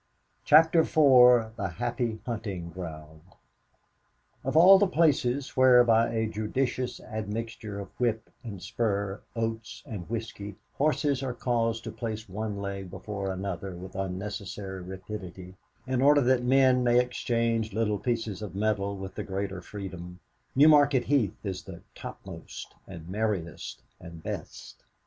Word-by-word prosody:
CHAPTER 160 +2 +6
IV 125 -8 +6
THE 95 -4 -3
HAPPY 120 -2 -2
HUNTING 100 -8 -4
GROUND 80 -3 -8 1.2
Of 135 +4 0
all 190 +4 +9
the 205 - +4
places 145 -6 +1
where, 130 -1 +7
by 115 0 +3
a 110 -1 0
judicious 125 +4 -2
admixture 110 0 -5
of 100 - -7
whip 115 -3 0 0.2
and 100 -6 -8
spur, 100 -2 -2
oats 115 0 -4
and 100 -5 -7
whisky, 110 -3 -5 0.2
horses 145 -2 +1
are 130 -2 -3
caused 115 -2 0
to - - -5
place 110 -2 -5
one 105 +2 -4
leg 100 -1 -5
before 95 +1 -5
another 95 -1 -4
with 90 +2 -9
unnecessary 95 0 -5
rapidity, 95 0 -8 0.3
in 130 -1 0
order 145 +1 +6
that 130 -1 +3
men 130 0 +4
may 120 0 +4
exchange 115 -2 0
little 105 0 0
pieces 115 -4 -2
of 100 -4 -7
metal 100 -1 0
with 95 0 -7
the - - -5
greater 95 -1 -4
freedom, 90 -3 -8 0.4
Newmarket 145 -2 +6
Heath 125 -6 +1
is 95 -3 -4
"the 85 -3 -11
topmost, - - -9
and 85 -4 -10
merriest, 90 - -3 0.2
and 85 -2 -11
best." - - -7
110 Hz, 135 wpm, -28 LUFS, 95-125 Hz, 1.2 s, all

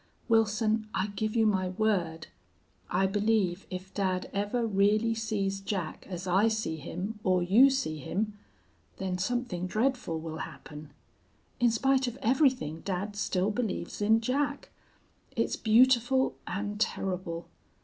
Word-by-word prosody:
Wilson, 220 -1 +2
I 190 +3 0
give 215 +1 -2
you 225 -1 +4
my 190 -3 +2
word; 180 -5 0 0.6
I 185 +2 +2
believe 200 -2 +1
if 185 0 -7
dad 185 -2 -1
ever 205 +4 0
really 215 +2 +2
sees 205 -3 -2
Jack 190 -5 -4
as 180 -1 -5
I 190 +4 +3
see 215 -7 -1
him 190 +8 -5
or 185 -4 +2
you 225 +10 +6
see 260 - -1
him, 210 +9 -2 0.6
then 185 -1 -3
something 205 -4 -2
dreadful 225 -5 0
will 160 0 -6
happen. 150 0 -8 0.7
In 245 -1 +5
spite 265 +3 +2
of 245 +1 -4
everything 255 - +2
dad 200 +3 -3
still 195 0 0
believes 215 -2 -3
in 220 +2 +4
Jack. 280 +4 -1 0.7
It's - - 0
beautiful 250 +3 +4
and 205 +2 -3
terrible. 180 -5 -2
205 Hz, 135 wpm, -29 LUFS, 185-225 Hz, 0.7 s, you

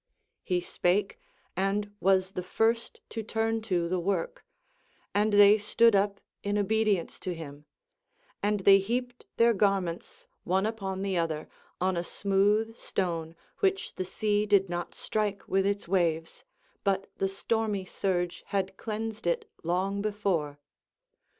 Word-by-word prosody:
He 180 -2 0
spake, 190 +3 0 0.4
and 200 +2 0
was 190 0 +3
the 180 - -3
first 225 +5 0
to 225 - -4
turn 225 +1 -1
to 180 -6 0
the 180 +1 0
work, 485 - -2 0.7
and 210 +1 +2
they 205 +1 +7
stood 230 +2 +4
up 200 0 +1 0.2
in 205 0 -1
obedience 210 -3 +1
to 180 -2 -4
him; 150 -2 -9 0.8
and 205 0 +1
they 195 +1 +7
heaped 245 +5 -3
their 235 0 +5
garments, 195 - -1 0.2
one 190 +2 +1
upon 195 -4 -3
the 190 -3 0
other, 160 -2 -2 0.3
on 185 +1 +1
a 170 - -1
smooth 205 +5 +1
stone, 165 -3 -2 0.2
which 390 +1 +1
the - - -3
sea 210 +2 0
did 195 -2 +4
not 175 0 -4
strike 205 -2 -2
with 195 0 +2
its 200 -2 -1
waves, 165 -3 0 0.4
but 195 -1 +1
the 195 - +1
stormy 205 0 -1
surge 180 -2 -2
had 195 -1 -2
cleansed 220 -2 -4
it 170 - 0
long 190 +4 0
before. 195 -9 -1
195 Hz, 140 wpm, -29 LUFS, 185-215 Hz, 0.8 s, they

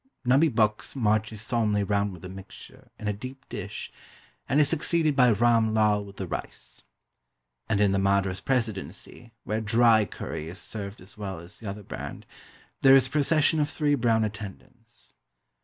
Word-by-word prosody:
Nubbee 135 +6 +5
Bux 110 -4 +1
marches 110 -2 0
solemnly 110 -4 +1
round 100 0 0
with 90 -1 -11
the - - -6
mixture, 95 +1 -12
in 105 - -6
a 105 - +1
deep 130 +6 -9
dish, 100 -4 -6 0.6
and 145 - +3
is 150 - +5
succeeded 160 0 +2
by 125 -2 +5
Ram 115 0 +3
Lal 105 -1 +3
with 100 -1 -12
the 95 - -4
rice. 85 - -6 0.8
And 105 -2 +1
in 105 -1 +4
the 100 - +1
Madras 100 -1 +1
Presidency, 115 -1 -3
where 110 +1 -2
dry 110 0 +4
curry 80 -4 -6
is 90 - -8
served 100 -2 -7
as 95 +3 -14
well 95 -5 -5
as 85 +3 -12
the 110 - -6
other 100 +1 -7
brand, - - -7 0.6
there 135 0 +8
is 135 -2 +5
a - - -5
procession 155 +1 +3
of 145 -1 +1
three 150 -1 +1
brown 115 -4 +2
attendants. 110 - -8
110 Hz, 175 wpm, -27 LUFS, 100-125 Hz, 0.8 s, there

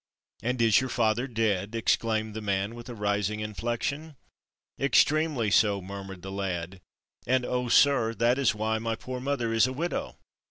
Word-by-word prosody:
"And 125 +3 -1
is 115 +2 +5
your 130 - -3
father 115 +2 +1
dead?" 110 -3 -1
exclaimed 110 -1 0
the 110 - -5
man, 100 +1 -1
with 120 +1 -10
a 120 - -6
rising 105 0 -1
inflection. 120 +8 -3 0.6
"Extremely 140 -3 +2
so," 100 -1 +4
murmured 95 -1 -8
the 95 - -6
lad, 95 -2 -4 0.5
"and, 130 0 +2
oh, 125 -1 -1
sir, 120 -4 +4
that 120 +3 +2
is 135 - +2
why 110 +1 -1
my 115 0 -2
poor 125 +2 -6
mother 125 -4 -1
is 115 +2 +4
a 130 - -4
widow." 170 +6 -3
115 Hz, 165 wpm, -27 LUFS, 105-125 Hz, 0.6 s, is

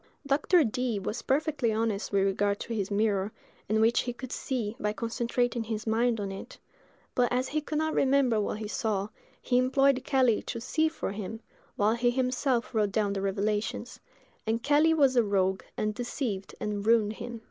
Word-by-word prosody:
Dr. 295 +5 +4
Dee 245 -1 -1
was 210 +4 -3
perfectly 280 -4 +1
honest 220 -2 -1
with 200 -1 +3
regard 200 +1 +1
to 235 - -4
his 200 -4 -2
mirror, 205 -1 +1 0.4
in 215 +1 +2
which 225 +2 +4
he 245 - -2
could 255 +1 -8
see 235 -5 -3
by 210 0 -1
concentrating 235 +1 -1
his 220 -1 -4
mind 230 +1 +1
on 200 -1 -3
it; 195 - -9 0.6
but, 245 -1 +2
as 250 +1 0
he 305 +1 -1
could 300 +1 -3
not 315 0 0
remember 260 -5 +3
what 210 - -2
he 215 -1 -5
saw, 205 -2 -1 0.3
he 245 - +2
employed 265 0 +3
Kelly 260 -5 +3
to 230 - -5
see 315 +7 +1
for 315 - -4
him, 210 +2 -5 0.4
while 210 +2 +3
he 240 +1 +2
himself 255 0 0
wrote 210 -3 +1
down 205 -1 +1
the 195 - -2
revelations: 205 +2 -2 0.5
and 230 +1 0
Kelly 300 +2 +4
was 275 -4 +4
a 240 - +6
rogue, 190 -3 +1 0.2
and 215 0 0
deceived 235 -4 -4
and 205 -1 -3
ruined 220 -1 +3
him. 235 +1 -7
230 Hz, 185 wpm, -29 LUFS, 210-255 Hz, 0.6 s, a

